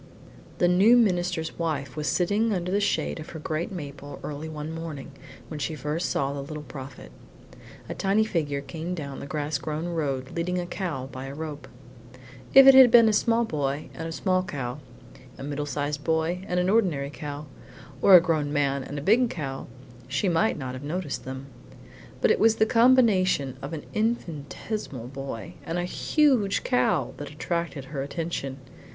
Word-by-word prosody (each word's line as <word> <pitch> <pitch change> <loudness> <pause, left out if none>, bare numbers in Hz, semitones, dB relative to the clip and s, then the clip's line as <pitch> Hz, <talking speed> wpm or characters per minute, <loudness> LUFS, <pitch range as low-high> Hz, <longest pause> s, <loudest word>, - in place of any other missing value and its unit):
II - - -23
The 175 - +3
new 195 +7 +6
minister's 175 -7 +1
wife 145 -5 -2
was 150 -1 -3
sitting 205 +10 +2
under 180 -1 -2
the 200 - +2
shade 200 -4 0
of 155 - -8
her 160 - -7
great 155 +3 -3
maple 145 -5 -7
early 150 +2 -5
one 155 0 -5
morning, 160 -4 -6 0.4
when 155 - -6
she 155 +2 -2
first 150 +4 -2
saw 140 0 0
the 140 - -4
Little 150 +2 -7
Prophet. 135 - -9 0.8
A - - -4
tiny 200 +3 +2
figure 150 -9 -1
came 165 +4 -5
down 140 -5 -6
the - - -7
grass 145 -1 -2
grown 155 +4 -3
road 140 -6 -2
leading 180 +2 -1
a 175 - -1
cow 170 -8 -4
by 130 +1 -7
a 135 - -7
rope. 150 -1 -6 0.8
If 270 0 +9
it 270 - +10
had 260 -2 +9
been 230 -1 +7
a - - +2
small 230 +2 +2
boy 145 -6 -2
and 165 - -5
a - - -5
small 185 +2 +1
cow, 135 -7 -5 0.6
a - - -8
middle 145 +1 -3
sized 145 0 -2
boy 165 +3 0
and 180 - 0
an 180 - +1
ordinary 175 -10 +2
cow, 145 0 -6 0.6
or 195 - +8
a - - +12
grown 155 -4 0
man 140 -2 +1
and 145 - -6
a 140 - -4
big 230 +7 +4
cow, 135 -8 -5 0.4
she 135 +9 0
might 180 +5 +2
not 130 -3 -5
have 130 - -7
noticed 155 0 -4
them; 130 +1 -6 0.8
but - - +4
it - - +2
was 225 0 +5
the 220 - +3
combination 220 - +4
of - - -6
an 160 -2 -6
infinitesimal 175 - -3
boy 135 -8 -6
and 165 - -3
a 175 - 0
huge 250 - +2
cow 125 +3 +1
that 145 -1 -6
attracted 160 -1 -3
her 135 - -2
attention. 140 -2 -4
160 Hz, 185 wpm, -26 LUFS, 140-185 Hz, 0.8 s, a